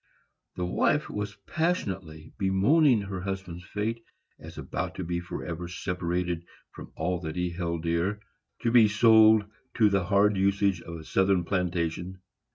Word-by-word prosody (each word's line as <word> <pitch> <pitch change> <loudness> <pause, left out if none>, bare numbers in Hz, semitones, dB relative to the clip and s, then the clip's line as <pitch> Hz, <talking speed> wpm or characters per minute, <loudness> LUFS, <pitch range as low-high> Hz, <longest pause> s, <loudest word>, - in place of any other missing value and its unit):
The 90 - -2
wife 90 - +1
was 105 -1 -4
passionately 95 - -3
bemoaning 110 +7 +4
her 95 -2 -5
husband's 95 -2 -5
fate, 110 +4 -3 0.4
as - - -11
about - - -4
to - - -4
be 85 +1 -2
forever 85 -1 -6
separated 90 -1 -2 0.3
from - - -11
all 90 -1 -1
that 80 -2 -6
he 90 -1 -1
held 85 -2 -3
dear, 85 +5 0 0.4
to 115 - +2
be 115 -3 +7
sold 110 0 +6 0.3
to 110 -3 +4
the 95 -2 +1
hard 100 +1 +3
usage 100 -1 +1
of 85 - -8
a 80 - -8
Southern 95 +2 +2
plantation. 90 0 -2
95 Hz, 150 wpm, -27 LUFS, 85-105 Hz, 0.4 s, be